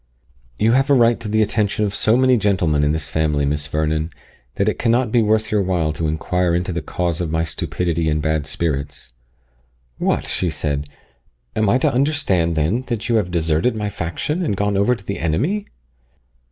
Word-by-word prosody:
"You 110 +2 +3
have 135 +3 +2
a 140 - +6
right 120 -2 +4
to 115 - -6
the 110 +1 +2
attention 105 0 0
of 100 - -2
so 110 +3 +2
many 130 0 +4
gentlemen 90 -9 +1
in 75 - +2
this 80 -1 -2
family, 75 -2 0
Miss 75 0 0
Vernon, 80 +2 -1 0.5
that 100 - 0
it 105 - 0
cannot 120 0 +2
be 120 - +4
worth 110 0 +1
your 105 -1 +2
while 90 -5 0
to 80 +1 -2
inquire 85 +3 0
into 90 +1 -1
the 85 - -2
cause 85 0 -2
of 85 - -2
my 80 +1 0
stupidity 85 0 -2
and 75 0 +1
bad 80 -1 -1
spirits." 75 -6 -3 0.9
"What!" - - 0
she 90 - 0
said, 75 -2 -3 0.7
"am 110 -2 +2
I 120 - +4
to 130 - +1
understand, 120 - +1
then, 80 +11 +1
that 115 -1 -3
you 115 - +3
have 100 -5 0
deserted 80 +7 +1
my 105 -1 -2
faction, 100 - -3
and 105 - -1
gone 100 0 0
over 100 +6 +3
to 100 - -14
the 100 - -4
enemy?" 145 - -1
90 Hz, 195 wpm, -20 LUFS, 80-110 Hz, 0.9 s, a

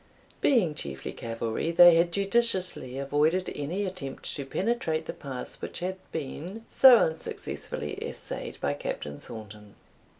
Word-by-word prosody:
Being 215 - +3
chiefly 70 - -5
cavalry, 115 +5 -3
they 175 +1 +8
had 170 +1 +3
judiciously 195 - +1
avoided 150 +6 +1
any 170 +8 -2
attempt 180 -8 -4
to 140 - -4
penetrate 190 - -1
the - - -5
pass 130 -3 -5
which - - -5
had 185 +1 -3
been 170 +9 -6
so 260 -3 +9
unsuccessfully 160 - -3
essayed - - -5
by - - 0
Captain 70 0 -5
Thornton. 105 -1 -11
160 Hz, 130 wpm, -28 LUFS, 130-185 Hz, -, so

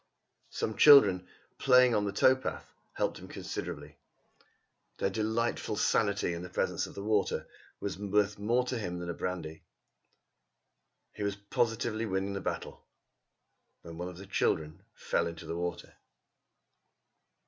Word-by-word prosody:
Some 110 - -3
children, 100 -12 +7 0.3
playing 125 -2 +6
on 105 -2 +1
the 100 - -1
tow 130 +6 +5
path, 130 - -6 0.2
helped - - -1
him - - -11
considerably. 75 0 -6 1.0
Their 95 - 0
delightful 110 +3 -1
sanity 100 -5 +1
in 85 - -5
the 90 - -7
presence - - -1
of - - -13
the 100 - -6
water 105 -1 0 0.3
was 100 -1 -4
worth 105 0 +1
more 120 +5 +2
to 125 -1 -2
him 90 -4 -4
than 85 0 -5
the - - -2
brandy. 80 -4 -5 1.5
He - - -9
was 100 -1 -1
positively 110 +2 -1
winning 95 0 -1
the 100 - -4
battle, - - -5 1.0
when 85 0 -9
one 90 - -3
of 90 - -11
the 95 - -9
children 80 -3 -1
fell - - 0
into 85 -1 -7
the 85 - -4
water. 85 0 -4
100 Hz, 145 wpm, -31 LUFS, 90-110 Hz, 1.5 s, children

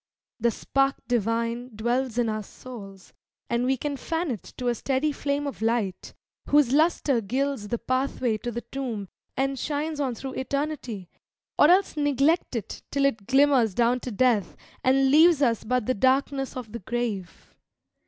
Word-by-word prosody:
The 235 +1 +3
spark 275 +4 +1
divine 230 +1 -1
dwells 240 +2 -1
in 240 -1 +2
our 215 -1 -1
souls, 200 -3 -11 0.4
and 235 +1 +1
we 265 +1 +2
Can 285 +2 -3
fan 325 +2 -2
it 220 - -4 0.2
to 250 - -3
a 240 - +3
steady 270 +5 0
flame 285 0 -2
of 280 -5 -5
light, 225 -4 -1 0.3
Whose 290 -4 +4
luster 295 -5 +3
gilds 255 +1 -2
the 235 - -1
pathway 255 -3 -1
to 240 - -4
the 240 +1 -4
tomb, 235 -8 -4 0.3
And 270 0 0
shines 300 +2 -2
on 260 -4 -1
through 265 +2 -6
Eternity, 265 - -3 0.5
or 295 - +8
else 370 0 +4
Neglect 290 +1 +2
it 220 -3 -5
till 280 -1 +1
it 225 -8 0
glimmers 265 -6 +4
down 240 +1 +3
to 250 - -6
Death, 225 -4 +1 0.3
And 265 +1 +4
leaves 320 +1 +6
us 230 -4 +2
but 250 0 0
the 255 - +1
darkness 270 +3 +1
of 235 -4 -7
the 235 - -5
grave. 210 -4 -4
255 Hz, 165 wpm, -26 LUFS, 230-275 Hz, 0.5 s, or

